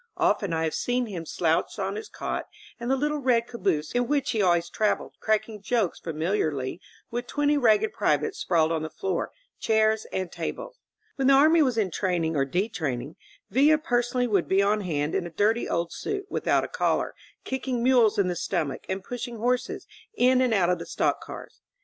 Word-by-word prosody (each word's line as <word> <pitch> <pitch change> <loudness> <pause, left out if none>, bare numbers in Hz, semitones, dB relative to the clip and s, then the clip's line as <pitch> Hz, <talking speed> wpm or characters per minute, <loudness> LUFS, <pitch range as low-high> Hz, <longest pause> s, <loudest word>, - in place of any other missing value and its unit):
Often 345 - +1
I 160 0 0
have 160 - -1
seen 245 0 0
him 175 -7 -6
slouched 165 -1 0
on - - -2
his 435 0 -6
cot - - -4 0.3
in 240 +1 -4
the 265 - +3
little 295 +2 -1
red 245 -4 +2
caboose 190 -11 -1
in 245 0 0
which 285 -1 +1
he 220 - 0
always 175 -2 +3
traveled, 210 +4 -1
cracking 215 -1 -1
jokes 210 -3 0
familiarly 160 -3 -2 0.3
with 240 +1 -3
twenty 290 +1 +1
ragged 250 - +3
privates 420 -2 0
sprawled 165 -2 +2
on 160 -1 0
the 155 - -4
floor, 190 0 -2 0.3
cjiairs 220 0 +2
and 185 -2 -3
tables. - - -6 0.4
When 270 -1 +1
the 275 - +7
army 315 +4 +6
was 255 -5 +2
entraining 180 -5 0
or 135 -1 +2
detrain 175 - -1
ing. 145 +5 -10 0.4
Villa 290 +7 +5
personally 245 -4 0
would 200 -7 +1
be 195 +1 +3
on 210 +1 +2
hapd 150 -5 -2
in 175 - -1
a - - -8
dirty 210 +7 +1
old 170 0 -1
suit, 405 -1 -4
without - - +1
a - - -3
collar, - - 0 0.3
kicking 260 -2 -2
mules 245 -4 +4
in, 200 -2 +3
the 180 - -1
stomach 160 -6 -2
and 190 0 -3
pushing 240 +1 -6
horses 250 +3 -1 0.3
in 255 - +4
and 255 -2 +2
out 185 -5 +3
of 180 - 0
the - - -7
stock - - 0
cars. - - -10
215 Hz, 190 wpm, -26 LUFS, 175-255 Hz, 0.4 s, the